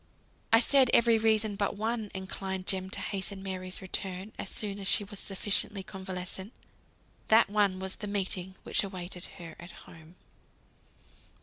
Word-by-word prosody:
I 225 - +8
said 265 +1 +5
every 230 -1 +5
reason 220 -1 +3
"but 200 0 -1
one" 220 0 -2
inclined 190 0 -3
Jem 190 -1 +1
to - - -3
hasten 195 0 -1
Mary's 185 -1 -4
return 190 +1 -4
as 195 - -4
soon 205 -2 -2
as 195 - -2
she 205 - +5
was 205 0 -8
sufficiently 200 0 0
convalescent. 190 0 -5 0.7
That 220 -2 +5
one 205 -3 +3
was 190 0 -5
the 210 - -5
meeting 190 -2 -1
which - - +1
awaited 180 -2 -6
her 170 -3 -9
at 175 - -10 0.2
home. 160 +1 -15
195 Hz, 150 wpm, -30 LUFS, 185-210 Hz, 0.7 s, I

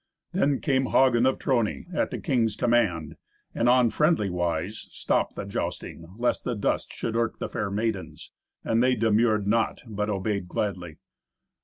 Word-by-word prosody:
Then 145 -7 +1
came 135 -3 +1
Hagen 130 -1 +4
of 130 - +1
Trony 120 -6 0
at - - 0
the - - -4
king's 120 -8 0
command, 105 -11 +1 0.4
and, 120 - +2
on 125 -2 +4
friendly 150 - +2
wise, 90 +3 -2
stopped - - -1
the - - -5
jousting, 85 +3 -5
lest 120 +1 0
the 125 - -2
dust 105 - -1
should 115 - -4
irk 115 -1 0
the - - -3
fair 100 - -3
maidens, 105 -1 -3 0.3
and 115 +1 +1
they 130 0 +3
demurred 110 -1 +2
not, 115 +3 0
but 105 -2 -3
obeyed 100 -1 -2
gladly. 90 -4 -3
115 Hz, 160 wpm, -26 LUFS, 100-125 Hz, 0.4 s, Hagen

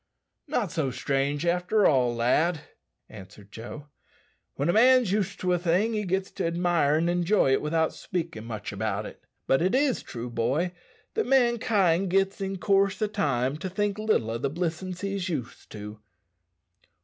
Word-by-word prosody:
"Not 245 - -1
so 160 -5 -1
strange 140 +4 -1
after 180 +5 +2
all, 125 -4 +3
lad," 150 +8 +1 0.5
answered 100 0 -13
Joe. 120 +7 -8 0.7
"When 140 - -1
a 170 - +2
man's 245 -2 +5
used 205 -2 -1
to 180 -1 +1
a 175 - +1
thing, 185 +6 +1
he 210 -1 -1
gits 190 +1 -1
to - - -2
admire 170 -3 +2
an' 165 +2 +1
enjoy 175 -2 +2
it - - +2
without 160 +1 0
speakin' 165 -9 -5
much 110 -3 -6
about 105 0 -2
it. - - -10 0.2
But 135 - +2
it 185 +7 +2
is 270 -1 +2
true, 120 0 -7
boy, 130 +10 0 0.4
that 445 - -1
mankind 225 -8 +2
gits 195 +2 +1
in 195 0 -3
coorse 195 0 +2
o' 215 - +2
time 140 - -1
to 185 +4 -5
think 205 +2 -1
little 215 - +1
o' 115 - -3
the 140 +2 -1
blissin's 175 +3 -4
he's 195 -2 -2
used 135 -8 -5
to." 105 0 -8
175 Hz, 170 wpm, -27 LUFS, 135-195 Hz, 0.7 s, man's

